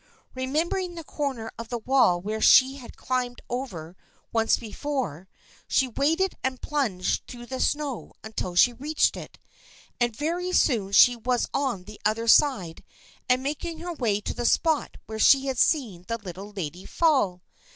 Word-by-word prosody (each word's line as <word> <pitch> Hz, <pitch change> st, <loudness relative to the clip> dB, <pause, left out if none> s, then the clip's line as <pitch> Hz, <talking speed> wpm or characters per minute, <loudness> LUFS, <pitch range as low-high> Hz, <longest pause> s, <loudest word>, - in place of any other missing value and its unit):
Re 260 Hz, 0 st, -4 dB
membering 345 Hz, +5 st, -1 dB
the 330 Hz, -, -7 dB
corner 265 Hz, -7 st, -4 dB
of 230 Hz, -1 st, -7 dB
the 240 Hz, -, -2 dB
wall 235 Hz, -7 st, +3 dB
where 215 Hz, +4 st, -4 dB
she 265 Hz, +1 st, +6 dB
had 250 Hz, -3 st, -12 dB
climbed 250 Hz, -1 st, -2 dB
over 185 Hz, -10 st, -5 dB, 0.4 s
once 225 Hz, -1 st, +2 dB
before, 225 Hz, -, -4 dB, 0.4 s
she 265 Hz, -, +2 dB
waded 325 Hz, +10 st, +1 dB
and 260 Hz, -1 st, -2 dB
plunged 235 Hz, -12 st, -1 dB
through 240 Hz, -1 st, -9 dB
the 260 Hz, +1 st, -6 dB
snow 290 Hz, -4 st, -2 dB
until 210 Hz, -5 st, -5 dB
she 240 Hz, +7 st, +5 dB
reached 295 Hz, +6 st, +1 dB
it, -, -, -10 dB, 0.6 s
and 240 Hz, -2 st, +1 dB
very 350 Hz, +6 st, -2 dB
soon 220 Hz, -, +2 dB
she 245 Hz, +4 st, +7 dB
was 245 Hz, +1 st, -1 dB
on 255 Hz, -10 st, -1 dB
the 210 Hz, +2 st, -12 dB
other 225 Hz, +2 st, 0 dB
side 225 Hz, -, +3 dB, 0.5 s
and 250 Hz, +1 st, +3 dB
making 305 Hz, +4 st, -4 dB
her 345 Hz, +2 st, -5 dB
way 225 Hz, -9 st, 0 dB
to -, -, -4 dB
the 240 Hz, -, -4 dB
spot 320 Hz, -3 st, +1 dB
where 220 Hz, 0 st, -7 dB
she 270 Hz, +4 st, +6 dB
had 265 Hz, -2 st, -2 dB
seen 225 Hz, -, +1 dB
the 230 Hz, -, -2 dB
Little 195 Hz, -1 st, -9 dB
Lady 180 Hz, -2 st, -6 dB
fall. 260 Hz, -, +1 dB
245 Hz, 165 wpm, -26 LUFS, 215-285 Hz, 0.6 s, she